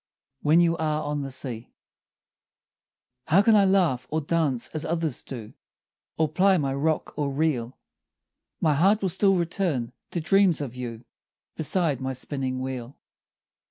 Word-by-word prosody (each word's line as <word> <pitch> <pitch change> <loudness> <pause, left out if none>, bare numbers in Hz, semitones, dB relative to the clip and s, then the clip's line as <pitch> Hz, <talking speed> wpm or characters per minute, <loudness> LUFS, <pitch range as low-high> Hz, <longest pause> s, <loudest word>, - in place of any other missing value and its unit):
WHEN 155 +3 +4
YOU 170 -1 +3
ARE 155 -1 -1
ON 145 0 -2
THE 135 - -4
SEA 125 -3 -5 1.6
How 180 +6 +5
can 225 0 +5
I 200 -1 +5
laugh 180 -10 +2
or 155 - 0
dance 150 -5 0
as 155 -1 -4
others 165 -4 -1
do, 115 -5 -8 0.6
Or 160 - +2
ply 185 +5 +3
my 140 -4 -1
rock 150 +3 -1
or 145 -1 0
reel? 135 -4 -1 0.8
My 155 -2 +3
heart 195 +8 +3
will 190 - +2
still 195 +3 +3
return 170 -8 -1 0.2
to 175 - -3
dreams 195 +1 +3
of 130 -4 -5
you 120 -2 -7 0.5
Beside 160 -4 +1
my 130 0 -2
spinning 130 0 -4
wheel. 130 -1 -6
150 Hz, 150 wpm, -25 LUFS, 130-170 Hz, 1.6 s, How